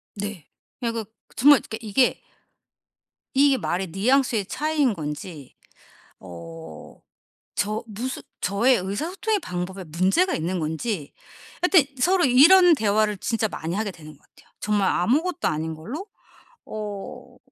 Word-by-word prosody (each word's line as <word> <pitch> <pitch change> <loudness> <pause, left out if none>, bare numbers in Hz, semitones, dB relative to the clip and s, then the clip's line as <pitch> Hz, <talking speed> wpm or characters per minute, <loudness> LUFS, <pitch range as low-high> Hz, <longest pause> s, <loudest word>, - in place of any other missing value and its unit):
네. 205 -6 -6 0.3
그냥 230 -1 -2
그 225 -2 -4 0.3
정말 280 +1 +7
그러니까 220 - -7
이게 230 +4 +1 1.1
이게 275 0 +4
말의 185 -2 -2
뉘앙스의 230 +1 +2
차이인 295 -2 0
건지 150 -2 -7 0.6
어 85 -3 -11 0.5
저 210 +2 -1
무슨 235 +5 -5 0.2
저의 230 +7 +3
의사소통의 335 - -2
방법에 180 - -5
문제가 185 - +1
있는 175 +3 -2
건지. 160 +1 -3 0.5
하여튼 315 -7 +3
서로 370 +3 +4
이런 335 +8 +7
대화를 215 -4 +1
진짜 225 +1 -1
많이 165 -2 -5
하게 205 -1 -2
되는 155 -3 -13
것 - - -33
같아요, - - -25
정말 205 -2 +1
아무것도 310 - +1
아닌 160 +1 -2
걸로. 260 - -7 0.6
어 210 -2 -7
210 Hz, 270 characters per minute, -24 LUFS, 180-270 Hz, 1.1 s, 정말